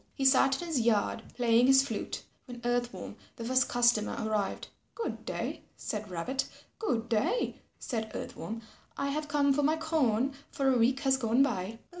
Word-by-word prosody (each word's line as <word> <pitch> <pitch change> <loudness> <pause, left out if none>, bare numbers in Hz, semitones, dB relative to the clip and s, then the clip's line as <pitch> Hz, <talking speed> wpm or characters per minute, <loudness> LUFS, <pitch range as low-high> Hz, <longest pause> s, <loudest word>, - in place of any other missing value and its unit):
He 270 - -1
sat 270 0 +5
in - - -5
his 320 -6 +1
yard 225 -1 +2
playing 240 0 +4
his 270 +1 +6
flute, 225 -5 -4 0.2
when 245 -1 -9
Earth 240 0 +1
Worm, - - -8 0.2
the 230 - -6
first 255 +1 +2
customer 240 -3 +3
arrived. 215 -2 -2 0.3
"Good 465 - -4
day," - - -3 0.2
said 210 -1 -4
Rabbit. 185 +11 -2 0.3
"Good 235 - -1
day," 260 - 0 0.2
said 220 -3 -3
Earth - - -5
Worm, 225 +1 -6 0.3
"I 280 - -1
have 300 +2 -2
come 285 -1 +3
for 290 - +1
my 305 +3 +2
corn, 275 -6 +1 0.2
for 275 -1 +1
a - - +3
week 255 +4 +3
has 270 -2 +3
gone 240 +1 +3
by." 220 -4 -2
250 Hz, 180 wpm, -30 LUFS, 225-275 Hz, 0.3 s, his